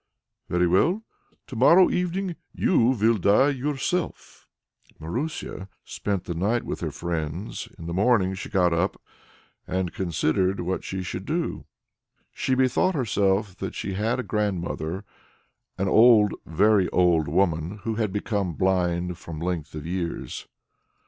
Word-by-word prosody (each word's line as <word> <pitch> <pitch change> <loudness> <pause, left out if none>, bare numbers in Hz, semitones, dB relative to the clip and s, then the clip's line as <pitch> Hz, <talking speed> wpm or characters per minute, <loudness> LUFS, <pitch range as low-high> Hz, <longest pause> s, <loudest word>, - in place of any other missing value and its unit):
"Very 90 0 +2
well! 160 - +2 0.4
To 130 - -9
morrow 170 +10 +6
evening 180 0 -1 0.2
you 160 -11 +3
will 115 -3 +2
die 105 +9 +4
yourself!" 145 +5 -3 0.5
Marusia 95 - -4 0.2
spent 100 -3 -3
the 85 - -4
night 105 +8 0
with - - -4
her 80 - -2
friends; 85 +4 -4
in 85 - -9
the 85 - -4
morning 95 -1 +3
she 95 - -6
got 90 -4 +2
up 85 - 0 0.7
and 95 -2 -2
considered 95 +1 0
what 90 +2 -2
she 95 -1 -4
should 90 +1 -5
do. 165 +2 -2 0.7
She 130 - 0
bethought 130 +8 +2
herself 100 - +1
that - - -5
she 95 - -4
had 110 +6 0
a - - -1
grandmother 95 -3 -2 0.7
an 95 +1 0
old, 110 0 +6
very 95 +3 +3
old 85 -4 +3
woman, 85 +3 0
who 115 - -1
had 110 -2 -1
become 100 -2 -2
blind 90 +1 0
from 80 -3 -8
length 85 -3 -3
of 75 -1 -6
years. 85 -1 -4
95 Hz, 140 wpm, -25 LUFS, 85-115 Hz, 0.7 s, morrow